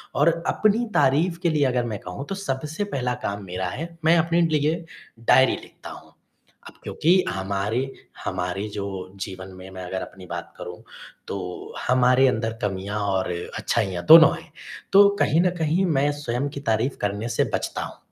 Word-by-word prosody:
और 150 +4 +5 0.2
अपनी 215 +3 +2
तारीफ़ 155 +5 +2
के 170 - +3
लिए 150 -3 +2
अगर 125 -1 +1
मैं 110 -4 -4
कहूँ 90 +10 -7
तो 195 - -2
सबसे 155 -1 -3
पहला 130 -10 -2
काम 100 0 -3
मेरा 90 0 -3
है 165 - -7
मैं 170 +1 +6
अपने 170 +1 +2
लिए 160 +1 +1 0.4
डायरी 130 +3 +5
लिखता - - -12
हूँ। - - -11 0.6
अब - - -12
क्योंकि 180 +4 +2
हमारे 100 +5 -2 0.5
हमारे 90 +3 -2
जो 100 -1 -4 0.4
जीवन 95 -1 -6
में 95 +1 -10
मैं 95 -1 -8
अगर 95 +1 -4
अपनी 95 -1 -10
बात - - -7
करूँ - - -8 0.5
तो - - -3 0.5
हमारे 125 +1 +5
अंदर 115 -3 0
कमियाँ 100 +1 -2
और 95 -1 0 0.3
अच्छाइयाँ 95 -6 -1
दोनों 160 0 +10
हैं। 165 - -14 0.4
तो 200 +1 +9
कहीं 160 +3 +3
न 180 - +3
कहीं 165 +4 +1
मैं 145 +2 +3
स्वयं 135 0 -2
की 140 - -7
तारीफ़ 115 +5 0
करने 105 +3 -2
से - - +1
बचता - - -2
हूँ, - - -9
125 Hz, 170 wpm, -24 LUFS, 100-160 Hz, 0.6 s, दोनों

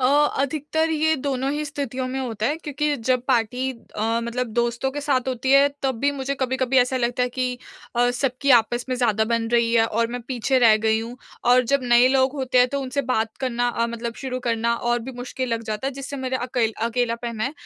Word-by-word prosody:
अ, - - +1 0.3
अधिकतर 310 +3 0
ये 315 0 +2
दोनों 270 -1 -2
ही 300 +1 -2
स्थितियों 275 -3 -4
में 265 +1 -3
होता 225 -4 -2
है 295 +5 0
क्योंकि 295 -2 -2
जब 250 +1 0
पार्टी 250 +2 +1
अ, 230 -1 -3
मतलब 245 +2 -2
दोस्तों 240 +3 0
के 290 - -5
साथ 265 -3 0
होती 255 +1 -2
है 275 +1 +6
तब 265 -1 +1
भी 285 - +2
मुझे 270 +1 -2
कभी-कभी 260 0 0
ऐसा 250 +1 +2
लगता 245 0 0
है 250 - +1
कि 250 0 -2 0.4
अ, 245 0 +3
सबकी 255 +2 -1
आपस 240 +2 -3
में 255 - 0
ज़्यादा 220 -3 +2
बन 230 -1 0
रही 235 -1 +3
है 225 -1 +4
और 230 +1 0
मैं 245 - -4
पीछे 260 +1 +1
रह 230 -3 +6
गई 220 0 +3
हूँ। 235 +2 -7 0.3
और 250 +1 +5
जब 280 -1 +3
नए 245 0 +5
लोग 260 0 +2
होते 255 -2 +1
हैं 250 0 +5
तो 280 +1 -2
उनसे 270 +1 -2
बात 220 -3 0
करना 245 -2 0
अ, 235 -1 0
मतलब 235 0 -5
शुरू 255 -1 -3
करना 235 -1 0
और 240 +1 0
भी 265 - -5
मुश्किल 255 +1 -4
लग 230 0 -1
जाता 215 +4 -3
है, 275 - -2
जिससे 275 +1 -6
मेरा 260 -1 -2
अकेल 235 -3 0
अकेलापन 235 -1 -2
है 260 +5 -1
250 Hz, 225 wpm, -23 LUFS, 235-265 Hz, 0.4 s, है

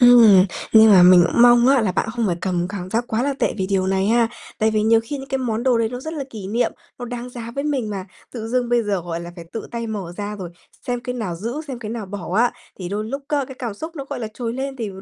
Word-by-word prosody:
Ừm, 230 -6 +8 0.3
nhưng 220 0 +8
mà 190 -3 +8
mình 180 -1 +8
cũng 235 - +3
mong 240 0 +7
á 275 -1 +5
là 210 -5 0
bạn 195 - -1
không 235 -2 -1
phải 175 -3 0
cầm 180 -1 -1
cảm 185 -2 -6
giác 230 +4 0
quá 225 +1 -1
là 280 +1 0
tệ - - 0
vì 190 -3 -1
điều 190 -1 0
này 190 0 +1
ha. 230 +1 +3 0.3
Tại 220 -1 +2
vì 215 -1 +1
nhiều 225 +1 +4
khi 285 +5 -5
những 270 0 -9
cái 270 - -1
món 235 -3 -2
đồ 250 -2 +3
đấy 225 -1 +1
nó 245 +2 -6
rất 315 +4 -6
là 290 -3 -4
kỷ 210 -5 -7
niệm, 230 +5 0 0.3
nó 245 - -5
đáng 245 0 -6
giá 235 -2 -7
với 280 - -2
mình 270 -7 -1
mà, 195 -2 -4 0.3
tự 225 -2 -5
dưng 245 0 0
bây 240 -1 +2
giờ, 205 -3 -1
gọi 170 0 -4
là, 170 0 -8
phải 170 - -9
tự 225 - -5
tay 235 -1 -4
mở 200 -6 -5
ra 205 0 -4
rồi 185 -4 -7 0.4
xem 245 -1 -1
cái 250 0 -5
nào 215 -8 -3
giữ, 230 - -4
xem 260 -3 -5
cái 220 -3 -6
nào 225 -3 -5
bỏ 190 -2 -6
á, 240 +2 +3 0.3
thì 180 -2 -5
đôi 205 +3 -3
lúc 275 +6 -5
á 290 -2 +1
cái 265 - -8
cảm 235 -5 -4
xúc 320 +9 -8
nó, 275 - -5
gọi - - -4
là, 220 - -3
trồi 230 -2 -3
lên 270 +2 -4
thì 225 -5 -4
225 Hz, 300 wpm, -21 LUFS, 200-245 Hz, 0.4 s, Ừm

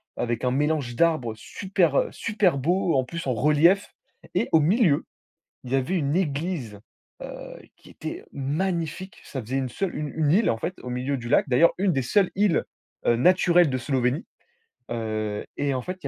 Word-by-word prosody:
avec 120 0 -2
un 125 - +2
mélange 145 -2 0
d'arbres 155 -6 +2
super, 180 - -1
heu, - - +2
super 205 -9 +1
beau. 175 +4 +1
En 130 - +3
plus 165 +4 -6
en 130 - +1
relief 150 - +3 0.4
et - - +1
au 160 - +7
milieu, 170 - +3 0.6
il 125 - -7
y - - +4
avait 135 +8 -1
une 145 -1 0
église, 145 - -2 0.4
heu, - - -9
qui - - -18
était - - -7
magnifique, 170 +5 -3
ça 135 - -5
faisait 130 +5 -2
une 130 -1 -1
seule, 190 +8 -3
une 150 - -3
une 155 -2 +2
île 210 +6 +4
en 115 - -1
fait, 180 - -3
au 125 - -6
milieu 130 +3 -1
du 120 -2 -7
lac. - - +3
D'ailleurs, 135 +7 +5
une 190 -2 +2
des 135 - 0
seules 195 - +2
îles, 200 -3 +2 0.4
heu, 120 - +5
naturelles 175 +3 +4
de 130 - -1
Slovénie. 130 - -1 0.7
Heu, 110 -2 -3
et 140 -1 0
en 130 - -2
fait, 185 +7 -5
il - - -3
145 Hz, 190 wpm, -25 LUFS, 125-180 Hz, 0.7 s, au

